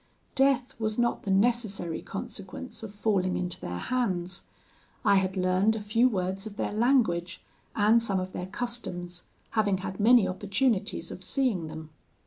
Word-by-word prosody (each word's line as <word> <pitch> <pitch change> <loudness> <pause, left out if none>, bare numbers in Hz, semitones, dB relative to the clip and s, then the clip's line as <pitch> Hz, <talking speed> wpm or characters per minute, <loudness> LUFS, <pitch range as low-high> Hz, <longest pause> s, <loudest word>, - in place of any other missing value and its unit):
Death 270 -1 +2
was 215 -1 -1
not 240 -1 +1
the - - -3
necessary 200 -4 +1
consequence 200 +5 -6
of 220 -3 -7
falling 200 -3 +1
into 180 -1 -2
their 90 0 -4
hands. 185 - -1 0.6
I 200 - +6
had 190 0 0
learned 185 +4 +3
a - - -2
few 225 +4 +3
words 190 -1 -2
of 205 -1 -10
their - - -2
language, 215 -8 +2 0.4
and 220 +2 +5
some 200 -4 0
of 185 0 -5
their 180 - -4
customs, 180 -6 -3 0.3
having 205 -3 +2
had 190 - -5
many 230 0 +6
opportunities 200 +4 0
of - - -8
seeing 235 - 0
them. 155 0 -8
205 Hz, 155 wpm, -28 LUFS, 185-235 Hz, 0.6 s, I